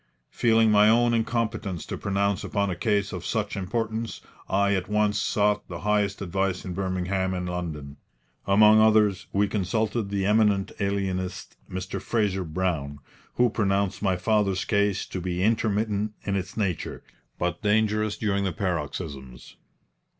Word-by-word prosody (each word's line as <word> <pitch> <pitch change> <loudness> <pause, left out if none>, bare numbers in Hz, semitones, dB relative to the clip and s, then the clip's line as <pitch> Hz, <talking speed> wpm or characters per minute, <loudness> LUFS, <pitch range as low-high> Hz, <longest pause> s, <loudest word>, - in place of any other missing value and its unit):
Feeling 115 -2 +3
my 105 0 +6
own 120 +1 +4
incompetence 110 -5 -1
to - - -5
pronounce 100 -1 -1
upon 100 -1 -1
a - - -2
case 100 +2 0
of 90 -2 -5
such 105 +1 -2
importance, 110 +3 -3 0.3
I 100 +1 +2
at 95 -1 -2
once 105 0 +1
sought 105 0 +1
the 85 -2 -7
highest 105 -1 0
advice 95 0 -1
in 90 - -4
Birmingham 95 0 -1
and 90 0 -3
London. 80 -5 -5 0.5
Among 105 +2 +6
others 110 -3 +3
we 100 +1 +2
consulted 105 +2 -1
the 100 -1 -1
eminent 105 -2 +2
alienist, 95 -2 -2
Mr. 95 +1 -5
Fraser 100 -5 0
Brown, 80 -4 -2 0.4
who 120 -2 +3
pronounced 100 -3 0
my 95 -3 +2
father's 100 -1 +1
case 100 -2 +1
to 95 - -5
be 90 0 -2
intermittent 105 -1 0
in 100 - -1
its 95 +2 -4
nature, 95 -6 -2 0.3
but 90 -1 -2
dangerous 105 0 +1
during 100 -2 0
the 95 - 0
paroxysms. 75 -7 -5
100 Hz, 145 wpm, -26 LUFS, 95-105 Hz, 0.5 s, my